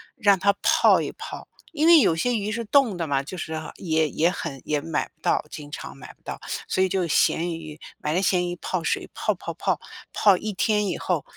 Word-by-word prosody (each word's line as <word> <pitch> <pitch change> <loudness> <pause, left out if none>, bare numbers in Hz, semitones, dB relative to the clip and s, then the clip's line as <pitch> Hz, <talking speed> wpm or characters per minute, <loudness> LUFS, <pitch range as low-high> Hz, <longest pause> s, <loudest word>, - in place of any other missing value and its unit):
让 200 -3 +3
它 200 +2 +3
泡 - - +5
一 - - -3
泡。 - - -9 0.3
因 310 +1 +1
为 335 -2 +8
有 195 -9 +3
些 245 +9 0
鱼 210 0 -2
是 230 +2 -3
冻 230 -5 +3
的 165 - -2
嘛， 140 -2 0
就 180 +7 -8
是 160 - -5 0.2
也 160 -3 0
也 170 +3 +2
很 140 -7 -5
也 150 -1 0
买 160 -1 -2
不 155 - -43
到 - - +1
经 145 -1 -8
常 70 - -7
买 - - -11
不 - - -40
到， - - -6 0.3
所 190 - +1
以 190 - +1
就 185 -1 0
咸 170 +2 +2
鱼， 155 -2 -8 0.2
买 150 - -2
了 180 - +1
咸 180 -2 +1
鱼 175 - -4
泡 185 -2 -2
水， - - -1
泡 - - -1
泡 - - -6
泡， - - -1 0.3
泡 200 -3 +5
一 215 +2 -4
天 210 +1 +1
以 175 - -2
后， 175 -5 -1
175 Hz, 250 characters per minute, -24 LUFS, 160-205 Hz, 0.3 s, 为